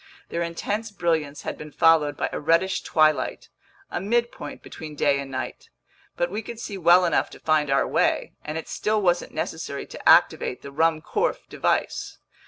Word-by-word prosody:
Their 170 - -2
intense 205 +6 -3
brilliance 160 -7 -1
had - - -5
been 150 0 -8
followed 160 -3 +4
by - - 0
a - - -2
reddish 165 +5 +2
twilight, 155 -1 +1 0.4
a - - -2
midpoint 235 -7 -2
between 155 -1 -9
day 140 -1 +2
and 140 -1 -6
night. 130 -1 -6 0.5
But 175 0 0
we 210 +3 -3
could 230 +1 -8
see 210 -3 -5
well 180 0 +5
enough - - +1
to - - -13
find 155 -2 +1
our 135 - +2
way, - - +1
and 150 +1 -4
it 160 - -6
still 215 0 0
wasn't 175 -3 +1
necessary 155 -2 -4
to - - -1
activate 125 - +4
the 140 - -8
Ruhmkorff 165 - 0
device. - - -1
165 Hz, 175 wpm, -25 LUFS, 150-190 Hz, 0.5 s, well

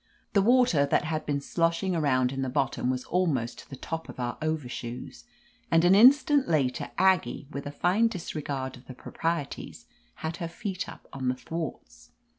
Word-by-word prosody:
The 200 - +5
water 230 - +4
that - - +2
had 155 0 -3
been 145 -1 0
sloshing 170 +4 0
around 130 -5 +2
in 135 0 -3
the 130 - -1
bottom 135 -2 0
was 130 0 -1
almost 135 -11 0
to - - -13
the 135 - -7
top 165 +5 -6
of - - -9
our 120 0 -2
overshoes, 130 - -4 0.4
and 165 +1 +4
an 180 - +6
instant 275 +6 +6
later 140 -6 0
Aggie, 185 -6 +2
with 140 0 -5
a - - -4
fine 185 +9 +2
disregard 145 - -4
of 125 - -18
the 130 - -9
proprieties, 165 +2 -4 0.3
had 160 +1 -4
her 170 - -3
feet 185 +2 -5
up - - -12
on 130 -2 -3
the 125 - +1
thwarts. 125 - -7
155 Hz, 180 wpm, -28 LUFS, 130-175 Hz, 0.4 s, an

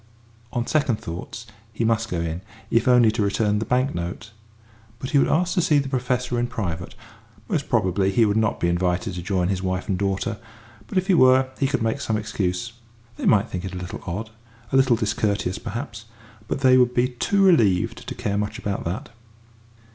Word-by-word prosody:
On 120 -1 -1
second 140 -5 +1
thoughts 90 +5 -7 0.3
he 115 +1 -2
must 115 0 +1
go 85 -2 -2
in 85 +1 -3 0.3
if 115 - +2
only 125 -3 +6
to 110 - -2
return 105 +1 +1
the 110 - -2
bank 130 +3 +1
note. 90 +6 -5 0.7
But 130 +2 -6
he 145 - +5
would - - +3
ask 175 +2 +1
to 180 - +2
see 160 -4 +3
the 140 -1 0
Professor 125 -2 -1
in 120 - 0
private. 90 -7 -4 0.5
Most - - -2
probably 95 +1 +2
he 115 +3 +4
would 105 -1 +1
not 110 -1 +1
be - - +1
invited 90 +2 0
to 90 - -5
join 90 -1 0
his 95 -1 -1
wife 95 -1 -2
and 95 -3 -1
daughter, 100 +1 -1 0.5
but 125 - -4
if 185 - +2
he 195 - +3
were, 130 -4 +5
he 135 - +2
could 135 -4 -1
make 110 0 -1
some 110 - 0
excuse. 105 0 -2 0.4
They - - -2
might 105 -2 +4
think 90 -1 -5
it 95 -1 -5
a - - -4
little 90 0 -6
odd 105 +6 -4 0.4
a - - 0
little 130 -2 +5
discourteous, 105 -3 -1
perhaps; 115 0 -6 0.4
but 135 - -3
they 130 -1 +6
would 125 -1 +3
be 125 +1 +3
too 195 +11 +1
relieved 110 - +3
to - - -5
care 100 0 -1
much 105 0 -3
about 100 -1 -3
that. 105 - -4
110 Hz, 205 wpm, -23 LUFS, 95-125 Hz, 0.7 s, only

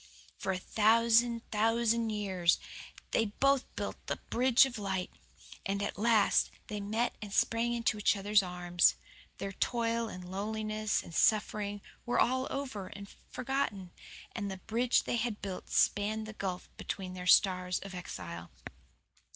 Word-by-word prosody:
For 190 - -2
a 185 - -1
thousand 230 +4 +3
thousand 225 +1 +2
years 190 -5 +1 0.5
they 225 - +2
both 275 +6 +2
built - - -5
the - - 0 0.2
bridge 255 +1 +5
of 255 -4 -5
light, 190 -2 -2 0.5
and 200 +1 -1
at - - -3
last 220 -1 +3 0.2
they 210 - -3
met 220 +4 0
and 210 -2 -7
sprang 230 +3 +1
into 230 -2 0
each 205 - +3
other's 205 +1 +3
arms. 180 -1 +2 0.4
Their 195 - -4
toil 230 +2 0
and 180 -2 -8
loneliness 215 +2 -2
and 170 - -11
suffering 205 +1 +1 0.2
were 245 - 0
all 260 +1 +2
over 255 -9 -4
and 200 +1 -10 0.2
forgotten, 245 -8 -2 0.4
and 205 -3 -3
the 190 - -5
bridge 230 +6 +1
they 240 - -1
had 225 -2 -2
built 190 -2 -6
spanned 215 +2 +2
the 215 - -8
gulf 190 -3 -4
between 185 -2 -5
their 180 0 -6
stars 180 -1 +4
of 195 -1 -8
exile. 85 - -7
210 Hz, 150 wpm, -32 LUFS, 190-230 Hz, 0.5 s, bridge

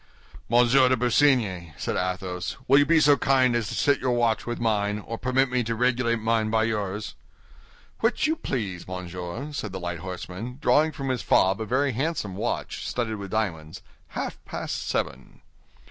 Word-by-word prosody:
"Monsieur 125 +2 +5
de 130 - +3
Busigny," 115 - +2
said - - -2
Athos, 90 0 -3
"will 140 +2 +6
you 145 - +3
be 165 -1 +5
so 145 -1 +6
kind 130 -2 +3
as 115 -3 0
to - - -4
set 140 -1 +2
your 130 -1 0
watch 120 -2 +1
with 120 - -3
mine, 105 -2 +1
or 115 +2 -6
permit 130 +2 +1
me 125 -1 +1
to 115 0 -2
regulate 120 0 +2
mine 110 -1 0
by 110 0 +2
yours?" 105 -2 -2 0.9
"Which 225 +6 +1
you 315 +1 +2
please, 100 - -4
monsieur!" 90 - -6
said 110 -8 -4
the 95 - -4
light 85 -1 -4
horseman, 95 +7 -6
drawing 155 +1 +3
from 135 -3 -5
his 125 -3 -1
fob 95 +4 +3
a - - -2
very 135 +4 +1
handsome 125 - -2
watch, 115 +5 -3
studded 110 -3 -2
with 100 -1 -7
diamonds; 90 -7 -3 0.2
"half - - -5
past - - -5
seven." - - -3
115 Hz, 175 wpm, -26 LUFS, 95-130 Hz, 0.9 s, will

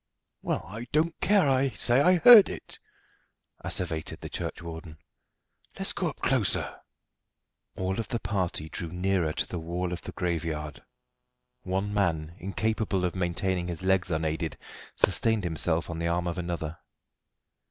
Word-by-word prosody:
"Well, - - -2
I 110 +5 -7
don't 160 +2 +1
care 200 -6 +4
I 135 0 +3
say 125 +1 +3
I 180 +5 +5
heard 220 +3 +9
it," - - -8 0.8
asseverated 80 -3 -3
the - - -6
churchwarden. 80 -2 -6 0.8
"Let's - - +1
go - - -1
up - - -8
closer." - - +1 1.0
All 95 +3 -1
of 110 - -3
the 120 - -2
party 95 -6 -2
drew 85 +2 -5
nearer 90 -2 0
to - - 0
the 90 - -4
wall 85 +2 -3
of 90 - -5
the - - -7
graveyard. 80 -4 -3 0.8
One 95 +2 -2
man, 85 -6 0
incapable 100 0 -1
of 90 - -1
maintaining 90 0 -1
his 85 0 -5
legs 95 -1 +2
unaided, 80 0 -2 0.4
sustained 110 -3 +2
himself 85 -1 +1
on 85 -1 -5
the 85 - -1
arm 85 +1 0
of 85 +1 -2
another. 85 -2 -4
90 Hz, 145 wpm, -28 LUFS, 85-100 Hz, 1.0 s, heard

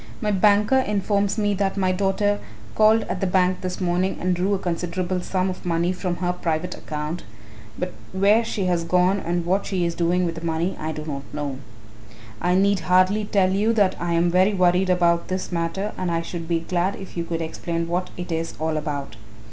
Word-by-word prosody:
My 210 -2 0
banker 210 +5 +4
informs 200 -2 0
me 205 -1 +1
that 195 0 -1
my 185 -1 +2
daughter 200 +2 +1 0.3
called 220 +1 +5
at 185 - -4
the 195 - +1
bank 185 0 +2
this 185 -1 -4
morning 180 +1 0
and 185 0 +1
drew 190 +3 +1
a - - 0
considerable 180 0 -2
sum 185 +1 -1
of 185 -1 -5
money 170 +1 +1
from 180 -1 -2
her 180 0 -1
private 170 -1 -2
account, 150 +3 -5 0.6
but 180 0 -3 0.2
where 200 +4 +4
she 210 -4 -2
has 175 -2 +1
gone 180 +3 +2
and 175 -1 -2
what 190 +3 +1
she 185 -3 0
is 170 - -1
doing 175 +2 +1
with 170 - -1
the 165 0 -8
money 170 +3 -1
I 155 +1 -3
do 155 0 -6
not 140 -3 -4
know. 145 -3 -4 0.8
I 180 +1 +2
need 200 +1 +3
hardly 185 +5 +3
tell 195 -2 +2
you 210 +4 +2
that 205 -4 +3
I 170 0 -1
am 170 +1 +2
very 185 +3 +3
worried 180 0 +3
about 170 -1 +2
this 185 0 -3
matter 175 +4 -2
and 185 -1 -1
I 165 0 0
should 165 -1 -6
be 165 -1 0
glad 180 +3 0
if 190 - -10
you 170 - -1
could 165 -1 -3
explain 165 +1 -3
what 180 +2 -1
it 175 0 -6
is 165 0 -2
all 160 0 -1
about." 145 -6 -4
180 Hz, 210 wpm, -23 LUFS, 170-195 Hz, 0.8 s, called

